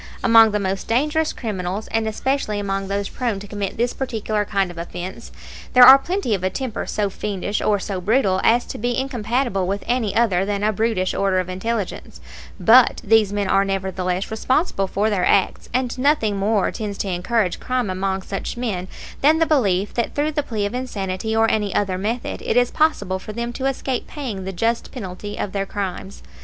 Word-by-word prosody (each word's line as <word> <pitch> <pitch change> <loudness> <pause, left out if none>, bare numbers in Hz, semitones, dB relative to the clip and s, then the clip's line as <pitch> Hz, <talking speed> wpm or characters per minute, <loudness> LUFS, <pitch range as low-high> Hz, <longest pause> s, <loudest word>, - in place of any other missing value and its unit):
Among 225 -1 +7
the 210 0 -1
most 195 -1 -2
dangerous 300 +6 +1
criminals, 200 -2 -4
and 225 0 0
especially 220 -1 -1
among 195 -1 -2
those 200 0 -2
prone 235 -5 -2
to 205 - -10
commit 200 -2 -4
this 240 +2 0
particular 220 -5 -2
kind 195 -3 0
of 170 - -9
offense, 180 +6 -7 0.4
there 250 - +8
are 265 +2 +10
plenty 350 - -1
of 190 -3 -2
a 185 - +2
temper 245 +3 -4
so 205 -2 -1
fiendish 205 +1 -3
or 210 - +2
so 190 -1 -4
brutal 200 -2 +2
as 240 +2 +4
to - - -7
be 240 +2 -1
incompatible 240 -6 -1
with 200 +2 -2
any 235 -5 0
other 200 -6 +3
than 200 0 -2
a 215 +1 +2
brutish 215 -3 0
order 195 -1 +1
of 185 0 -3
intelligence; 200 +2 -4 0.4
but 240 +2 +6
these 215 -1 +4
men 205 -1 -1
are 195 0 +3
nevertheless 190 -1 -2
responsible 220 - 0
for 210 +3 0
their 190 -3 0
acts; 195 0 +1
and 250 0 -1
nothing 255 -7 +2
more 200 0 +1
tends 205 -2 -5
to - - -3
encourage 185 +2 0
crime 250 -6 -1
among 190 0 -2
such 195 +4 -5
men 200 -7 -3 0.3
than 305 +3 +5
the 325 - +3
belief 205 - +1
that 235 - -2
through 295 +2 +1
the 295 -1 0
plea 220 -7 -3
of 205 - -3
insanity 220 -4 -3
or 225 0 +4
any 210 -3 -1
other 190 -2 0
method 225 +5 -3
it - - 0
is 245 0 +3
possible 245 -12 +1
for 215 - -8
them 235 +2 -4
to 265 +2 -2
escape 265 -1 -2
paying 235 -11 -5
the 190 - -3
just 230 +5 -1
penalty 205 -3 -7
of 200 - -3
their 195 0 -2
crimes. 195 -1 -5
210 Hz, 195 wpm, -21 LUFS, 195-240 Hz, 0.4 s, are